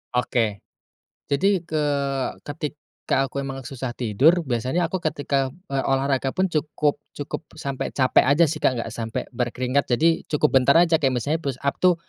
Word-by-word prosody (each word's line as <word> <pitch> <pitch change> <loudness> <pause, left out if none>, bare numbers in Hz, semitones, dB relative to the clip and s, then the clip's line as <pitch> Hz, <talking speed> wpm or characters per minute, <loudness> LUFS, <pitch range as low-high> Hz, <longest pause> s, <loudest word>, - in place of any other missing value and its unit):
Oke. 115 -4 +1 0.7
Jadi 180 +5 +1
ke 155 -2 -1 0.6
ketika 145 -2 -3
aku 140 +1 -4
emang 135 -1 -6
susah 130 -1 -5
tidur, 135 - +3
biasanya 130 +7 0
aku 185 +1 -3
ketika, 140 -4 0 0.2
eee, 135 -1 +1
olahraga 135 0 +1
pun 185 +7 0
cukup 150 -3 -1 0.2
cukup 145 +2 -4 0.2
sampai 140 -3 -3
capek 130 -2 +3
aja 145 +5 +4
sih, 155 +1 -3
Kak, 130 - +2
nggak 115 - -4
sampai 115 -1 -4
berkeringat, 125 +2 -1
jadi 165 +1 +3
cukup 150 -1 +1
bentar 140 +2 +4
aja, 165 -2 +4
kayak 135 -3 +2
misalnya 150 +7 -1
push-up 140 -1 -2
tuh 180 -1 +5
140 Hz, 160 wpm, -23 LUFS, 130-155 Hz, 0.7 s, tuh